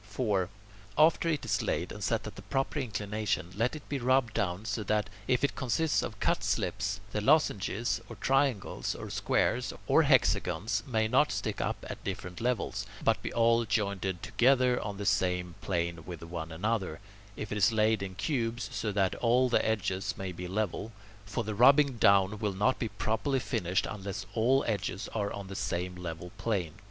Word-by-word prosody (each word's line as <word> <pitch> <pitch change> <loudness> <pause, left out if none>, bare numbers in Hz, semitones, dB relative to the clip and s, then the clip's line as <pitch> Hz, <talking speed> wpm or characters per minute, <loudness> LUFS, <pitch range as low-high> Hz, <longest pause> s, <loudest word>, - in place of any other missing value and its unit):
4. 100 -3 -1 0.5
After 160 +2 +4
it 155 -4 -1
is - - +1
laid - - -1
and - - -7
set - - 0
at - - -7
the - - -9
proper 135 +3 -1
inclination, 105 -6 -2
let 115 +7 0
it 150 - -10
be 140 - -2
rubbed 130 -2 +2
down 95 +2 -1
so 110 - -2
that, 105 +1 0 0.2
if 125 0 +2
it 140 - +1
consists 145 +5 +1
of - - -5
cut - - +1
slips, - - -1
the 105 - -1
lozenges, 115 -4 +2
or 115 - -7
triangles, 135 0 0
or - - -7
squares, - - +1
or - - +5
hexagons 110 0 +2
may 110 -3 +1
not 130 +6 +3
stick - - -2
up - - -3
at - - -7
different 90 +2 -5
levels, 110 -5 -1 0.2
but 115 - +2
be - - -4
all 115 0 +3
jointed 100 -4 -1
together 125 +3 +3
on 100 -1 -5
the 100 - -4
same 90 -2 +1
plane 85 -3 -2
with 85 -1 -8
one 85 -1 -6
another; 95 -1 -1 0.4
if 105 - -5
it 105 - -1
is 105 +3 +5
laid 110 -1 +2
in 95 -1 -5
cubes, 115 - -2
so 105 - -1
that 95 -2 +1
all 125 +2 +3
the 120 - +3
edges 100 -3 -1
may 95 -1 -4
be 90 +1 -6
level; 105 +2 -2 0.4
for 100 +4 -2
the 110 0 -3
rubbing 135 +3 +5
down 100 0 +4
will 105 -3 -1
not 105 +7 +1
be 115 - -1
properly 115 +7 -1
finished 90 -7 0
unless 100 -2 -5
all 125 +4 +3
the - - -2
edges 100 0 -3
are 100 -2 -1
on 100 -1 -6
the 95 0 -8
same 90 0 -2
level 90 0 -6
plane. 95 -9 -1
105 Hz, 185 wpm, -30 LUFS, 95-120 Hz, 0.5 s, or